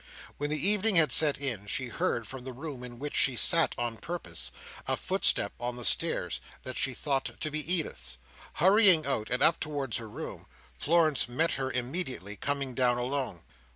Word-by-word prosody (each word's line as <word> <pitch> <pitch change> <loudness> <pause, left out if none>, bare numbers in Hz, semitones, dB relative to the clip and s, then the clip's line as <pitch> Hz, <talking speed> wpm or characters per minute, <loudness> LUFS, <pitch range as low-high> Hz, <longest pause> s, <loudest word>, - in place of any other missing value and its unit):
When 145 +1 -3
the 150 +4 +4
evening 210 0 +5
had 155 -5 +6
set 150 0 +5
in, 120 -8 -5
she 130 +4 -4
heard, 115 -1 -3
from 130 +1 -9
the 130 0 -8
room 135 -1 -8
in 120 -1 -10
which 145 +3 -6
she 130 - +3
sat 165 +7 +3
on 120 -1 -4
purpose, 110 - -3 0.4
a - - -1
footstep - - +3
on 120 +1 -4
the 120 -1 -5
stairs 65 - +1 0.2
that 130 - -7
she 135 -1 0
thought 135 0 -3
to 155 - -3
be 155 +3 +2
Edith's. 155 - 0 0.4
Hurrying 190 -2 +5
out, 135 -6 -3
and 125 - 0
up 165 - +3
towards 145 -6 -3
her 115 -2 -8
room, - - -9 0.3
Florence 155 -5 +1
met 160 +7 -1
her 135 -1 -4
immediately, 125 - -5
coming 140 +1 -4
down 125 -1 +1
alone. 125 - -4
135 Hz, 185 wpm, -28 LUFS, 120-155 Hz, 0.4 s, had